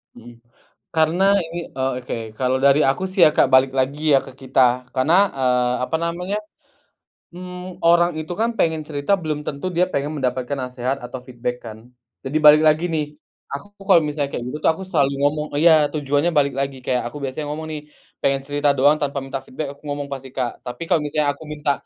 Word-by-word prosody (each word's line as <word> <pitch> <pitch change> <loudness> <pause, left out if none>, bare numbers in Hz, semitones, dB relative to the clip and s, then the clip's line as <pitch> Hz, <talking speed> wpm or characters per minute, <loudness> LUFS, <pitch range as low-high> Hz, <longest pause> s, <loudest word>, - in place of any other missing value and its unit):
Mhm. 120 0 -13 0.6
Karena 160 +4 +2 0.2
ini, 165 +1 -6
eee, 130 0 -1
oke, 125 - -5 0.2
kalau 130 0 +1
dari 140 +2 +5
aku 135 +7 +1
sih 190 - -2
ya, - - +6
Kak, - - +5
balik 130 0 +5
lagi 145 +4 +1
ya 135 - +7
ke - - -10
kita, 130 0 0 0.3
karena, 135 +6 +2 0.2
eee, 125 -2 +1
apa - - 0
namanya, 180 +4 -2 1.0
mmm, 180 +1 -9
orang 175 +1 +5
itu 155 +2 -5
kan 230 - +2
pengen 160 -1 +1
cerita 145 +4 -1
belum 155 -5 -3
tentu 140 +4 -5
dia 180 +2 +4
pengen 140 +2 -1
mendapatkan 130 +1 -2
nasehat 125 +1 -3
atau 125 +1 -7
feedback 125 -1 -4
kan. 110 -1 -8 0.5
Jadi 140 +4 0
balik 150 +1 +9
lagi 155 +2 +4
nih, 155 -2 0 0.5
aku 140 +8 -6 0.2
kalau 180 -4 +6
misalnya 150 -2 -2
kayak - - -3
gitu 150 - -4
tuh, - - +5
aku 190 - -8
selalu 140 -6 +2
ngomong 150 +1 +1
iya, 170 +1 +7 0.2
tujuannya 145 +2 +1
balik 140 -2 +2
lagi 140 -1 -2
kayak 125 -1 +1
aku 120 - -8
biasanya 135 +3 -4
ngomong 160 +1 -6
nih, 150 -1 -5 0.4
"Pengen 135 0 +1
cerita 145 0 +1
doang 145 +3 +5
tanpa 145 -2 -3
minta 135 0 -5
feedback," 145 +3 -5
aku - - -28
ngomong 145 -1 -4
pasti, 135 -1 -7
Kak. 125 -3 -1
Tapi 125 +5 -7
kalau 175 - +4
misalnya 150 0 0
aku 145 +3 -11
minta 150 -1 -1
145 Hz, 200 wpm, -21 LUFS, 130-155 Hz, 1.0 s, balik